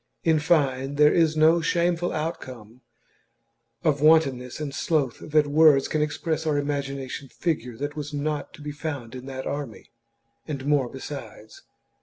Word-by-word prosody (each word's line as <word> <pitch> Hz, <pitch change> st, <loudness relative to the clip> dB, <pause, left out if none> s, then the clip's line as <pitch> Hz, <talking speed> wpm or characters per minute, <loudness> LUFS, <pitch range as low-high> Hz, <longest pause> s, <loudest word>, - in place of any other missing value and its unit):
In 160 Hz, -2 st, +3 dB
fine, 140 Hz, -3 st, +1 dB
there 150 Hz, +1 st, +5 dB
is 160 Hz, -2 st, +3 dB
no 160 Hz, +2 st, +5 dB
shameful 175 Hz, +1 st, +1 dB
outcome 130 Hz, -7 st, -6 dB, 1.0 s
of 145 Hz, -3 st, +1 dB
wantonness 140 Hz, -6 st, +3 dB
and 150 Hz, -2 st, -4 dB
sloth 145 Hz, -4 st, 0 dB
that 155 Hz, 0 st, +2 dB
words 145 Hz, -2 st, +5 dB
can 155 Hz, -, -1 dB
express 155 Hz, +1 st, -1 dB
or 150 Hz, -2 st, +2 dB
imagination 140 Hz, -2 st, -3 dB
figure 125 Hz, -9 st, -3 dB
that 145 Hz, +3 st, -4 dB
was 150 Hz, -1 st, -5 dB
not 150 Hz, 0 st, -3 dB
to 150 Hz, -, -13 dB
be 150 Hz, -, -4 dB
found 145 Hz, -6 st, -5 dB
in 130 Hz, +1 st, -8 dB
that 130 Hz, -1 st, -6 dB
army, 140 Hz, -6 st, -6 dB, 0.6 s
and 140 Hz, -4 st, -5 dB
more 145 Hz, -4 st, +2 dB
besides. 135 Hz, -5 st, -9 dB
145 Hz, 150 wpm, -25 LUFS, 135-155 Hz, 1.0 s, there